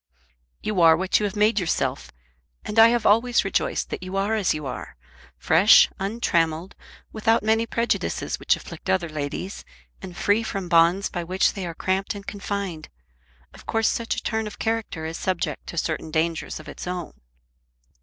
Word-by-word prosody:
"You 210 -4 0
are 165 -1 +7
what 190 +2 +1
you 210 - 0
have 205 +1 -3
made 210 +1 +3
yourself, 180 -3 -1 0.6
and 210 - 0
I 225 - +10
have 235 -1 +1
always 230 +2 +3
rejoiced 195 - -1
that - - -4
you 185 +1 -5
are 200 +3 0
as 210 -4 +1
you 150 -1 -3
are, 130 - -6 0.4
fresh, 190 +7 +6
untrammelled, 180 -5 0 0.4
without 225 0 +2
many 225 +1 +2
prejudices 235 +1 -1
which - - +2
afflict - - -9
other 180 -3 +1
ladies, 155 +5 -5 0.4
and 180 -2 -9
free 205 +2 +2
from 195 -5 -4
bonds 170 +4 +4
by 175 -2 -4
which 185 +3 +1
they 195 -4 -5
are 165 - -6
cramped 190 +4 -1
and 200 -1 -9
confined. 200 -5 -5 0.6
Of - - -15
course 225 -1 +1
such 230 -1 -1
a - - -5
turn 220 -1 -1
of 210 - -9
character 220 -8 -2
is 160 +1 -4
subject 185 -2 -3
to 170 - -7
certain 160 -1 -2
dangers 160 +1 -1
of 155 - -12
its - - -8
own." 180 -2 -4
195 Hz, 175 wpm, -24 LUFS, 170-215 Hz, 0.6 s, I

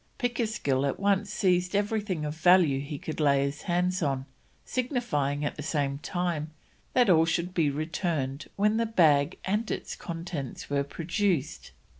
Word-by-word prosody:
Pickersgill 220 - 0
at - - -2
once 200 0 +1
seized 180 -1 +1
everything 205 -5 -1
of 150 - -3
value 165 -3 +4
he 145 +1 -5
could 155 +3 -6
lay 140 -2 +4
his 140 +1 -3
hands 180 +1 +1
on, 135 -4 -1 0.4
signifying 165 - -1
at - - -3
the - - -5
same 140 -2 -1
time 170 -2 -2 0.4
that 250 -2 +4
all 165 -4 +6
should 170 +2 -1
be 165 -5 +2
returned 150 -2 -2
when 210 +2 +2
the 230 0 +1
bag 160 -6 +3
and 210 +4 0
its - - -4
contents 165 - -6
were 140 0 +2
produced. 165 +1 -1
165 Hz, 155 wpm, -28 LUFS, 145-195 Hz, 0.4 s, all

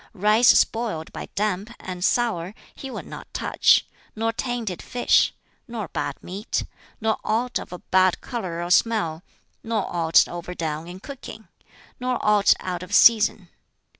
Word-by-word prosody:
Rice 215 +5 +4
spoiled 220 -9 0
by - - -6
damp, 205 +1 -1
and 180 -1 -6
sour, 210 -5 0 0.2
he 270 - -8
would - - -7
not - - -10
touch, - - +3 0.3
nor 225 +1 -1
tainted 230 -6 -3
fish, 245 -1 +2 0.4
nor 225 -7 -5
bad - - -4
meat, 200 +5 -3 0.4
nor 220 -1 0
aught 235 +3 0
of - - -10
a 180 - -6
bad 185 0 +2
color 180 -9 -4
or 175 - -4
smell, 180 -7 +2 0.4
nor 225 -3 -1
aught 165 -1 +4
overdone 170 -2 -5
in 180 +2 -9
cooking, 275 +1 -10 0.5
nor 250 0 -1
aught 210 -1 +5
out 180 -1 -4
of 180 - -3
season. 215 -5 +5
210 Hz, 145 wpm, -24 LUFS, 180-230 Hz, 0.5 s, aught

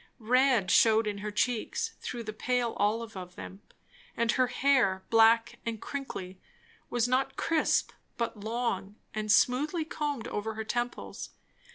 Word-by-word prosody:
Red 245 -3 +3
shewed 225 0 +5
in 205 -1 -3
her 210 +1 -4
cheeks, 220 +2 -1
through 240 -2 -5
the 215 -1 -6
pale 245 +1 0
olive 225 +2 0
of 180 -1 -8
them; 195 +2 -9 0.6
and 235 0 +2
her 255 +1 +2
hair, 245 -7 +2
black 225 +1 +4
and 230 -2 -3
crinkly, 190 -11 -6 0.5
was 240 -1 +1
not 265 +2 0
crisp 325 -2 +1 0.3
but 230 -2 -3
long, 215 -2 -2 0.2
and 215 -1 -1
smoothly 295 - +3
combed 295 -7 -3
over 220 +1 -3
her 220 - -3
temples. 240 +2 -4
230 Hz, 145 wpm, -29 LUFS, 215-250 Hz, 0.6 s, shewed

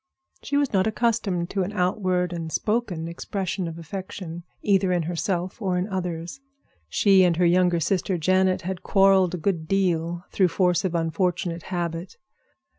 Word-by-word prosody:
She 285 - -1
was 285 -4 +1
not 190 +1 +3
accustomed 215 -6 0
to 195 - 0
an 185 +2 -2
outward 180 -1 0
and 165 -2 -5
spoken 210 -7 -1
expression 185 +1 -3
of 165 0 -6
affection, 175 0 -7 0.2
either 195 -2 +3
in 175 -2 +1
herself 175 +4 -2
or 185 -3 0
in 180 +2 -1
others. 180 +3 -4 0.5
She 195 - +5
and 175 -2 +3
her 180 - +3
younger 175 0 +3
sister, 185 +2 0
Janet, 185 +2 +2
had 185 0 -4
quarreled 195 -2 +4
a - - -4
good 170 -2 -1
deal 175 -3 0
through 190 - +3
force 180 0 +1
of 180 -2 -1
unfortunate 170 +1 -1
habit. 175 0 -4
180 Hz, 160 wpm, -24 LUFS, 170-195 Hz, 0.5 s, She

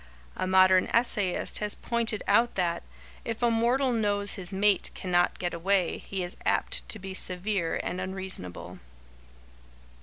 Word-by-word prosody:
A - - -2
modern 185 0 +5
essayist 210 -6 +1
has 210 -1 0
pointed 230 -3 -2
out 240 +1 +3
that 175 -3 0 0.4
"if 230 +1 -4
a 235 - +4
mortal 245 +3 +2
knows 205 -2 0
his 180 -2 -6
mate 200 0 +2
cannot 175 -1 +1
get 175 -1 -3
away, 180 +1 0
he 190 -2 -5
is 175 - -2
apt - - 0
to - - 0
be 190 -1 -7
severe 185 -1 0
and 185 - -3
unreasonable." 185 - -4
195 Hz, 145 wpm, -28 LUFS, 185-220 Hz, 0.4 s, modern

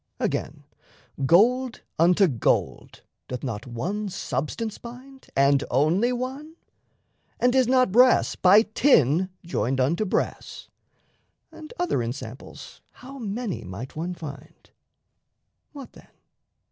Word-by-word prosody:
Again, - - -3 0.6
gold 245 - +3 0.2
unto 180 +4 +5
gold 125 -8 -1 0.2
Doth 125 -1 -6
not 115 -3 -5
one 195 - -4
substance 180 - -4
bind, 260 +3 -12
and 140 0 +3
only 165 - +2
one? 265 +6 -5 0.8
And 245 0 +3
is 260 -2 +3
not 255 -4 +3
brass 250 +4 +4
by 200 +4 +6
tin 185 - +3 0.2
joined 130 -5 -1
unto 150 +11 +1
brass? 185 - -3 0.8
And 320 -1 -12
other 355 - 0
ensamples 120 +1 -8
how 270 +2 -12
many 210 - -4
might 100 +7 -8
one 175 +3 -4
find! 145 -4 -11 1.0
What 280 -3 -11
then? - - -17
190 Hz, 110 wpm, -25 LUFS, -, 1.0 s, by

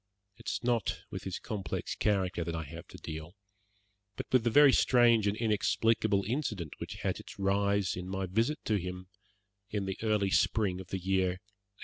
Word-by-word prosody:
It - - -15
is - - -3
not 120 -4 0
with - - -6
his 95 -2 -3
complex 100 -7 -4
character 95 -5 0
that 85 0 -3
I 80 - -3
have 80 +3 -10
to - - -12
deal, 80 +3 -7 0.8
but - - -5
with 130 -3 +4
the 120 - +2
very 145 +2 +7
strange 120 -4 +5
and 100 +1 0
inexplicable 110 -1 +2
incident 110 - -2
which - - -6
had - - -1
its - - -11
rise 100 0 +1
in 90 +1 -6
my 95 0 -2
visit 115 +11 0
to 105 - +2
him 90 0 -6 0.6
in 100 -2 -2
the 95 0 -4
early 105 -3 +1
spring 95 -4 +2
of 95 - -11
the 95 - -3
year 95 0 +1
'82. 95 - -13
100 Hz, 190 wpm, -31 LUFS, 90-110 Hz, 0.8 s, very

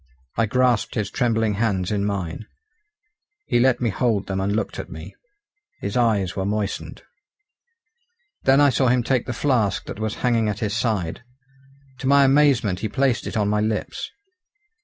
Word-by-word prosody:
I 115 - +1
grasped 125 0 +1
his 105 -2 -2
trembling 115 -4 +1
hands 95 -5 0
in 100 -1 0
mine. 100 0 -4 1.0
He 120 - +1
let 130 0 +3
me 120 -3 0
hold 105 -1 0
them 95 -1 -2
and 100 +1 0
looked 110 - -3
at - - -6
me. - - -9 0.7
His 100 - -4
eyes 110 -7 +1
were 95 - -2
moistened. 105 0 -3 1.4
Then 135 +1 +4
I 145 -1 +5
saw 130 +1 +2
him 125 0 +3
take 125 -1 0
the - - -2
flask 120 -5 0
that - - -7
was 110 -1 -2
hanging 115 -3 +2
at 105 - -3
his 105 -1 -2
side. 105 -8 -1 0.8
To 130 - -3
my 140 +1 +6
amazement 135 -9 +3
he 110 - -3
placed 130 +3 0
it - - -4
on 105 -1 +1
my 105 +1 +1
lips. 110 0 -2
110 Hz, 170 wpm, -23 LUFS, 100-125 Hz, 1.4 s, my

